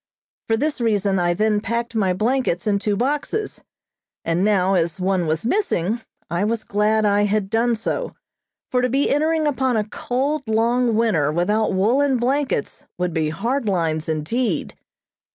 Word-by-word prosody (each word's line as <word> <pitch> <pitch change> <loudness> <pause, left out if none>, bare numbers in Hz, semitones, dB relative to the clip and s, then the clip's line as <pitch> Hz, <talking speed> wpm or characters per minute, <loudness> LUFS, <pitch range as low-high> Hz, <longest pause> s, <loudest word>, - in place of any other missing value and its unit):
For 225 - +2
this 290 +1 -1
reason 205 -4 +1
I 175 0 +1
then 215 +1 +1
packed 235 +1 -3
my 200 -5 +1
blankets 215 -2 0
in 205 -2 +1
two 210 0 0
boxes, 295 - -2 0.6
and 165 +2 +1
now 195 -2 +2
as 170 0 0
one 185 -2 0
was 160 +5 -1
missing 230 - 0 0.3
I 170 +4 -1
was 220 +1 -1
glad 215 +1 +1
I 205 0 +3
had 205 -1 -1
done 230 +1 +2
so, - - -3 0.6
for 250 - +2
to 250 - +1
be 275 +3 +1
entering 310 +2 +1
upon 260 -4 +1
a 210 -1 -1
cold, 270 +5 -2
long 230 +2 +2
winter 205 -11 +2
without 205 +7 +1
woolen 255 +8 +2
blankets 260 - -1
would 180 -1 -1
be 160 -2 0
hard 235 - -2
lines 165 -4 0
indeed. 160 - -1
215 Hz, 160 wpm, -21 LUFS, 185-250 Hz, 0.6 s, I